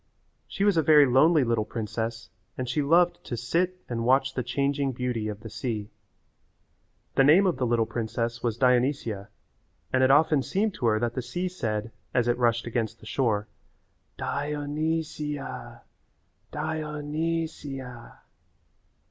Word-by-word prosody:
She 200 - -2
was 205 -4 +3
a - - +5
very 150 -1 +7
lonely 145 +4 +5
little 115 -3 +1
princess 115 +1 -4 0.3
and 130 - -3
she 135 +5 0
loved 175 +4 +3
to 120 - -5
sit 175 +10 0
and 115 -1 -3
watch 130 +2 +3
the 130 - -1
changing 140 +1 0
beauty 125 -3 -2
of 105 -1 -5
the 110 - -8
sea. 110 -2 -4 1.2
The 135 - +4
name 160 +8 +6
of 180 -8 +1
the 130 -2 0
little 115 -1 +2
princess 115 +1 -3
was 115 -2 -1
Dionysia 125 -5 +1 0.6
and 130 - +3
it 130 - +5
often 150 +1 +5
seemed 200 +9 0
to 120 - -1
her 110 -1 +3
that 120 0 -1
the 130 - -2
sea 175 +10 -3
said, 110 -11 -3 0.2
as 120 -2 +3
it 120 +1 +1
rushed 115 -1 +2
against 115 -1 -2
the - - -15
shore, 110 -3 0 0.7
"Di 145 +1 -2
o 145 0 -4
ny 160 +3 0
si 150 -1 -5
a, 135 - -8 0.7
Di 160 0 -2
o 150 -1 -5
ny 165 +3 -1
si 145 -3 -7
a." 125 -3 -10
130 Hz, 170 wpm, -27 LUFS, 115-150 Hz, 1.2 s, very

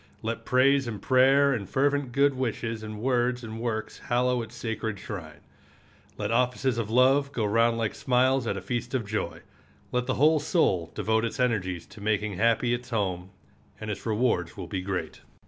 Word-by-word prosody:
Let 115 +1 -3
praise 135 +1 +3
and 110 -3 -4
prayer 135 +4 +4
and 100 -7 -4
fervent 140 -1 +1
good 140 +2 +3
wishes 115 -3 -3
and 110 -1 -7
words 125 0 +1
and 110 0 -6
works 115 -2 -3
hallow 125 0 +1
its 115 +1 -9
sacred 110 -2 -3
shrine. 85 -6 -8 0.8
Let 105 +1 -2
offices 125 0 +1
of 110 -2 -3
love 135 +4 +4
go 115 -5 -1
round 115 +2 +3
like 110 -2 -1
smiles 130 0 +2
at - - -1
a - - -5
feast 120 +1 -3
of 120 -4 -1
joy. 105 +1 -3 0.5
Let 125 0 -1
the 130 - 0
whole 155 +3 +4
soul 95 - +1
devote 110 0 +1
its 115 +3 -3
energies 95 -8 0
to 110 - -14
making 105 -2 -1
happy 115 +2 +2
its 120 +1 -4
home, 95 -5 -2 0.5
and 110 -1 -4
its 100 - -6
rewards 105 -6 0
will 95 - -5
be 90 +2 -4
great. 90 -4 -4
115 Hz, 180 wpm, -27 LUFS, 105-130 Hz, 0.8 s, prayer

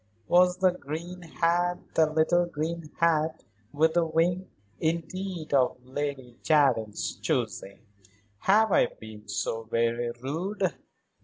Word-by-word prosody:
Was 180 0 +4
the 185 0 +4
green 175 +2 -7
hat, 175 +1 0 0.2
the 155 -1 +3
little 165 +3 +3
green 165 0 -4
hat 160 -1 +1 0.3
with 160 +2 +2
the 175 0 +3
wing, 170 +3 0 0.3
indeed 170 0 -3
of 130 -3 +3
Lady 130 -2 -5
Jardine's 125 -9 +2
choosing? 100 +1 -2 0.6
Have 215 - +4
I - - +5
been 110 -1 -12
so 115 - -2
very 115 +1 0
rude?" 180 - -2
160 Hz, 120 wpm, -27 LUFS, 135-175 Hz, 0.6 s, I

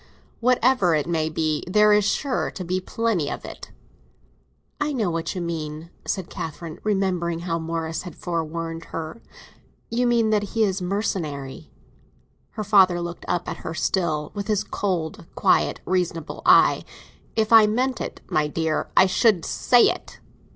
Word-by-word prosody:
"Whatever 245 -7 +3
it 150 - 0
may 160 -2 0
be. 155 -1 -1
There 210 +2 +5
is 210 -1 +4
sure 260 +5 0
to 185 - -7
be 185 +2 -1
plenty 195 -7 -1
of - - -6
it." - - -9 1.1
"I 295 0 0
know 215 -9 0
what 165 +1 -3
you 180 - -3
mean," 160 -1 -5 0.2
said 190 -4 -2
Catherine, 160 0 -7
remembering 180 -5 0
how 170 -1 -2
Morris 165 0 -3
had 180 -4 -9
forewarned 165 -1 -4
her. 160 +7 -6 0.7
"You 245 +1 +1
mean 230 -2 +3
that 210 +1 -1
he 225 - +4
is 195 -2 0
mercenary." 170 -8 -3 0.8
Her 215 - -4
father 190 -4 +5
looked 170 0 -6
up 175 - -1
at - - -4
her - - -6
still, 160 -3 -1
with 200 -1 -5
his 210 -3 +1
cold, 170 -4 -3
quiet - - +2
reasonable 175 -3 -2
eye. - - +6 0.5
"If 220 0 +1
I 220 -2 +9
meant 250 +3 0
it, - - -6
my 150 -1 +1
dear, 160 +1 -1
I - - +8
should 195 -2 +3
say 245 -1 +4
it! - - -1
180 Hz, 160 wpm, -24 LUFS, 165-210 Hz, 1.1 s, I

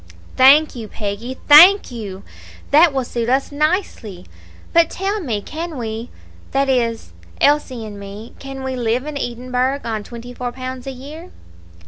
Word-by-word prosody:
"Thank 285 +4 +6
you, 225 -3 -7
Peggy, 215 +5 -5
thank 345 +4 +8
you; 200 -5 -7 0.5
that 315 +3 +6
will 265 -1 -1
suit 235 -1 -3
us 270 +3 +1
nicely. 285 - -2 0.5
But 335 -1 +5
tell 395 +3 -2
me, 230 - -3
can 325 -1 -6
we 225 0 -5 0.4
that 275 0 +1
is, 235 -3 -1 0.3
Elsie 280 -5 +1
and 205 -1 -9
me 200 +3 -10
can 270 -1 -8
we 265 0 -3
live 240 +2 -1
in 300 -1 -6
Edinburgh 255 +1 -2
on 220 -2 -3
twenty 240 +2 -10
four 245 0 -4
pounds 255 0 -7
a - - -3
year?" 295 +7 -10
255 Hz, 155 wpm, -19 LUFS, 230-290 Hz, 0.5 s, thank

